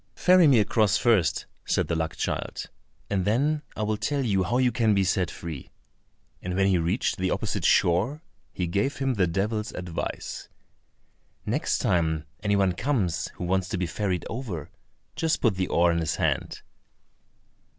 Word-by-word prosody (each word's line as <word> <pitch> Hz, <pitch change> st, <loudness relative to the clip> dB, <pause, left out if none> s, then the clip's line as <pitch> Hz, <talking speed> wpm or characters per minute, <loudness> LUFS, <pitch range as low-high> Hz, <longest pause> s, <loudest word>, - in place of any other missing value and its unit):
"Ferry 180 Hz, -2 st, +5 dB
me 135 Hz, -4 st, +6 dB
across 105 Hz, -2 st, +3 dB
first," 95 Hz, -, +2 dB, 0.2 s
said -, -, 0 dB
the 85 Hz, -, -1 dB
luck 80 Hz, 0 st, -2 dB
child, -, -, -3 dB, 0.4 s
"and 95 Hz, -2 st, 0 dB
then 140 Hz, +10 st, +1 dB
I 110 Hz, -, -2 dB
will 105 Hz, 0 st, 0 dB
tell 140 Hz, +6 st, -1 dB
you 100 Hz, -4 st, +2 dB
how 115 Hz, +7 st, 0 dB
you 125 Hz, -1 st, +3 dB
can 110 Hz, -2 st, +2 dB
be 100 Hz, -, +3 dB
set 95 Hz, -1 st, +1 dB
free," 80 Hz, -6 st, -7 dB, 0.7 s
and 90 Hz, 0 st, -4 dB
when 95 Hz, 0 st, +3 dB
he 95 Hz, -3 st, +3 dB
reached 85 Hz, +8 st, 0 dB
the 95 Hz, 0 st, 0 dB
opposite -, -, -2 dB
shore 105 Hz, -, +2 dB, 0.3 s
he 90 Hz, -, -2 dB
gave 100 Hz, +10 st, -1 dB
him 135 Hz, -1 st, 0 dB
the 95 Hz, -6 st, +2 dB
devil's 105 Hz, +5 st, -1 dB
advice: 90 Hz, -2 st, -5 dB, 1.0 s
"Next -, -, 0 dB
time 80 Hz, -3 st, 0 dB, 0.2 s
any 105 Hz, -1 st, +1 dB
one 95 Hz, -2 st, +3 dB
comes, 90 Hz, -, -1 dB
who -, -, -6 dB
wants 95 Hz, +1 st, 0 dB
to -, -, -2 dB
be 90 Hz, -, -1 dB
ferried 90 Hz, +1 st, -2 dB
over, 105 Hz, -, -5 dB, 0.4 s
just 160 Hz, -1 st, 0 dB
put 115 Hz, -5 st, +3 dB
the 95 Hz, -1 st, -1 dB
oar 85 Hz, 0 st, +3 dB
in 85 Hz, -, 0 dB
his 80 Hz, -2 st, -1 dB
hand." -, -, -1 dB
95 Hz, 170 wpm, -26 LUFS, 90-115 Hz, 1.0 s, me